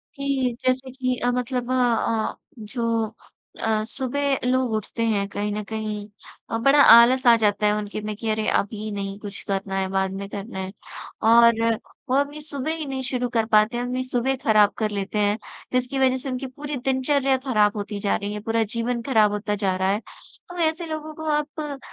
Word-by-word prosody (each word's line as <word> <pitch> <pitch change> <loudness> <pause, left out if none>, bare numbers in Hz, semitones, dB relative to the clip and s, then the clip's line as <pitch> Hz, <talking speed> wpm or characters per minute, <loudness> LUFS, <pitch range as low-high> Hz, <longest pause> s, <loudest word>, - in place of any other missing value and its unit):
कि 275 -3 -1
जैसे 260 +1 0
कि 255 -1 -1
अ, 245 0 +1
मतलब 250 0 -2
अ - - +2
अ, 230 -3 +1 0.2
जो 230 0 -1 0.6
अ, 220 -1 +1
सुबह 275 +2 -1
लोग 255 -1 +1
उठते 220 +2 -2
हैं 200 -2 0
कहीं 205 +1 -2
न 210 0 -3
कहीं 215 -1 -4 0.4
अ, 225 - -1
बड़ा 275 +5 +5
आलस 240 +3 +7
आ 235 - +9
जाता 210 -1 +1
है 210 - +3
उनके 210 0 -4
में 210 0 -4
कि 225 +1 -3
अरे, 215 0 0
अभी 215 +1 -1
नहीं 200 -1 -4
कुछ 205 -1 -8
करना 195 0 -2
है, 190 - 0
बाद 190 0 0
में 195 +1 -5
करना 200 0 -6
है। 190 0 -4 0.6
और 235 0 +7 0.6
वो 255 - +2
अपनी 285 +2 0
सुबह 290 0 -4
ही 320 -2 -5
नहीं 270 -1 -4
शुरू 250 -1 -2
कर 230 -2 +1
पाते 215 +3 +4
हैं, 240 - -1
अपनी 255 +1 -2
सुबह 255 +1 0
खराब 215 -2 +5
कर 215 -1 -1
लेते 200 +1 -2
हैं, 205 0 +2 0.4
जिसकी 255 +2 0
वजह 260 -1 +3
से 260 +1 -6
उनकी 260 +1 -3
पूरी 290 +3 -6
दिनचर्या 270 0 +2
खराब 210 -5 +2
होती 205 0 -4
जा 200 0 +1
रही 205 0 -3
है, 210 - -4
पूरा 225 +2 0
जीवन 235 +2 -2
खराब 220 -5 +3
होता 210 0 -2
जा 195 -2 0
रहा 190 +1 0
है। 205 - 0 0.5
तो 355 - -9
ऐसे 330 +2 -6
लोगों 310 -1 -5
को 315 - -7
आप 295 -1 -3
235 Hz, 205 wpm, -24 LUFS, 210-260 Hz, 0.6 s, आ